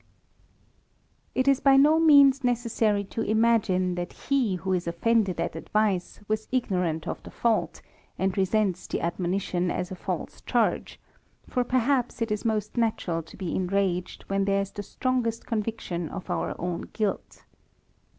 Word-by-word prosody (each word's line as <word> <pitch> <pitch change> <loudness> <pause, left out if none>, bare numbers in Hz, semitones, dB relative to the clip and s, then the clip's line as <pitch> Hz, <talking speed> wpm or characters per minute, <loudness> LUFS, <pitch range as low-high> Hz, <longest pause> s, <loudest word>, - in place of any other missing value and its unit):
It 260 +1 +1
is 275 -1 +5
by 275 -1 +5
no 300 +4 +6
means 280 -4 +6
necessary 230 -4 +1
to 215 +3 -5
imagine, 215 -5 +2
that 175 0 -4
he 255 -9 0
who 185 +2 -2
is 180 -1 -1
offended 190 +1 +1
at 170 - -2
advice, 205 -4 -1
was 215 0 -1
ignorant 180 -10 -1
of - - -4
the - - -11
fault, 230 -2 0 0.3
and 190 0 0
resents 195 -1 +1
the - - -2
admonition 180 +1 -1
as 180 +1 -3
a - - -4
false - - -5
charge; - - 0 0.5
for 250 - 0
perhaps 250 0 +1
it 230 -2 -1
is 210 - -1
most 215 -1 -1
natural 215 -7 0
to 165 - -15
be 185 -4 -3
enraged, 185 -1 -1
when 195 0 0
there 200 0 +2
is 195 - -9
the 205 - -6
strongest 235 +1 -2
conviction 210 -7 -3
of 190 - -6
our - - -2
own 175 -1 -4
guilt. 210 -3 -3
205 Hz, 155 wpm, -26 LUFS, 180-235 Hz, 0.5 s, no